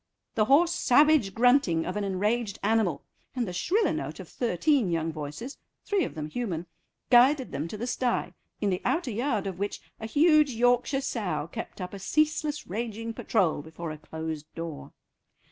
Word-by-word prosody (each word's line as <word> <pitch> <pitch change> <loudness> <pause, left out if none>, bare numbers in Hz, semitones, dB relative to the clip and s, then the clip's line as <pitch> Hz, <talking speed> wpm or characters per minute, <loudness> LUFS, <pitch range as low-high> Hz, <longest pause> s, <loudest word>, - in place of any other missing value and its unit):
The 215 - +2
hoarse 330 +8 +4
savage 285 - +4
grunting 235 - +3
of 180 - -3
an 210 - -1
enraged 205 +2 -1
animal 205 -8 +1 0.3
and 245 -3 -1
the 180 - -5
shriller 370 - +1
note - - -4
of - - -8
thirteen 245 - +1
young 165 -1 0
voices, 155 - -7 0.3
three 405 -3 +1
of - - -7
them 155 -1 -4
human, 175 -3 -3 0.5
guided 260 +2 +5
them 145 +4 -3
to 210 - -6
the 230 - -3
stye, 250 0 -1 0.3
in 205 -2 +1
the 180 - -1
outer 325 -7 0
yard 225 -2 -1
of 190 -2 -5
which 200 +1 -2 0.2
a 220 - -5
huge 300 +2 +4
Yorkshire 245 +3 +2
sow 180 - -2
kept - - -7
up 180 0 -5
a 200 - -6
ceaseless 300 +6 0
raging 225 +2 -4
patrol 190 -10 +1
before 160 +2 -7
a 155 - -7
closed 160 0 -6
door. 165 -3 -6
220 Hz, 175 wpm, -28 LUFS, 175-260 Hz, 0.5 s, guided